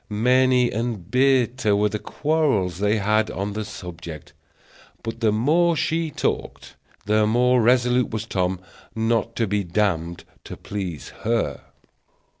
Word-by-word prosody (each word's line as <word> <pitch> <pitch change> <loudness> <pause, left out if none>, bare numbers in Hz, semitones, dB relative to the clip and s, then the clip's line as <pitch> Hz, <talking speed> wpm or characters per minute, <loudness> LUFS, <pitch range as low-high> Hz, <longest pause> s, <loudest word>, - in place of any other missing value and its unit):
Many 125 +3 +3
and 110 -5 -4
bitter 125 -4 +2
were 105 +1 +2
the 105 - -4
quarrels 140 - 0
they 105 +2 +2
had 110 +1 +1
on 100 +2 -4
the 110 +1 -3
subject; 85 -6 -9 0.7
but 115 0 -5
the 110 -2 +2
more 160 +10 +2
she 165 +1 0
talked, - - -3 0.3
the 105 +1 +2
more 125 +2 +3
resolute 125 +1 +3
was 110 0 -4
Tom 95 -4 -1 0.4
not 115 0 0
to 115 - +1
be 100 0 -1
damned 85 -3 -1 0.2
to - - -8
please 90 -9 -6
her. 110 - -1
110 Hz, 135 wpm, -23 LUFS, 100-125 Hz, 0.7 s, Many